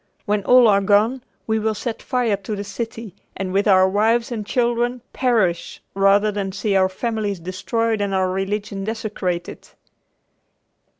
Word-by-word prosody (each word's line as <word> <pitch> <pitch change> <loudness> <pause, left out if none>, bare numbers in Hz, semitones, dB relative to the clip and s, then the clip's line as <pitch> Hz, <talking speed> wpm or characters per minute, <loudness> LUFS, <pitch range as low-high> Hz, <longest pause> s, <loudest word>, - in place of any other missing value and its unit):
When 205 -1 0
all 250 -1 +6
are 200 -2 +4
gone 215 +6 +2 0.2
we 220 0 0
will 220 0 -1
set 225 +2 -5
fire 245 -5 0
to 200 +2 -5
the 200 - -4
city 225 0 -6 0.2
and 185 -1 -3
with 200 +2 +1
our 190 -2 +6
wives 225 +5 +1
and 225 -3 -3
children 240 +2 0
perish 220 -10 0
rather 195 +2 +3
than 195 -2 -3
see 200 0 -1
our 190 -1 +3
families 210 -1 -3
destroyed 215 +5 -2
and 200 -1 -1
our 190 -1 +1
religion 195 +1 -3
desecrated." 200 -5 -4
210 Hz, 155 wpm, -21 LUFS, 195-230 Hz, 0.2 s, all